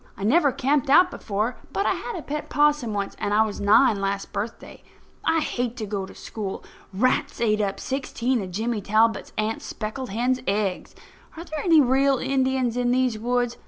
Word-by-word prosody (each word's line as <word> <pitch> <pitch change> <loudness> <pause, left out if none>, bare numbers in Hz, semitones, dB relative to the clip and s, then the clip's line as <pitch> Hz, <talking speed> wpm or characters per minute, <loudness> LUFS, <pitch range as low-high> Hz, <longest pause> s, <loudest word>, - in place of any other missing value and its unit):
I - - -6
never 285 +6 +4
camped 280 +3 0
out 360 +6 +6
before; 215 +4 -2
but 395 - -1
I - - +3
had 470 - -5
a 335 - -6
pet 300 +1 -5
'possum 295 -5 +2
once, 200 -1 -3
and 205 - 0
I 220 - +5
was 210 - -5
nine 215 +1 +4
last 195 0 -3
birthday. 215 +3 -6 0.4
I 325 0 +2
hate 245 -4 -2
to 220 - -3
go 200 -2 -4
to - - -13
school. 205 -4 -6 0.3
Rats 230 +7 0
ate 215 -2 +2
up 200 -1 -2
sixteen 260 -2 -1
of 190 - -6
Jimmy 220 +4 -2
Talbot's 220 +3 +1
aunt's 215 +1 -2
speckled 230 +4 -5
hen's 245 +5 0
eggs. 200 -2 -1 0.4
Are 335 - -6
there 310 -3 -6
any 330 -4 +6
real 270 +1 +3
Indians 260 -2 0
in 245 0 +1
these 250 -3 +1
woods? 245 +1 0
240 Hz, 190 wpm, -24 LUFS, 210-270 Hz, 0.4 s, out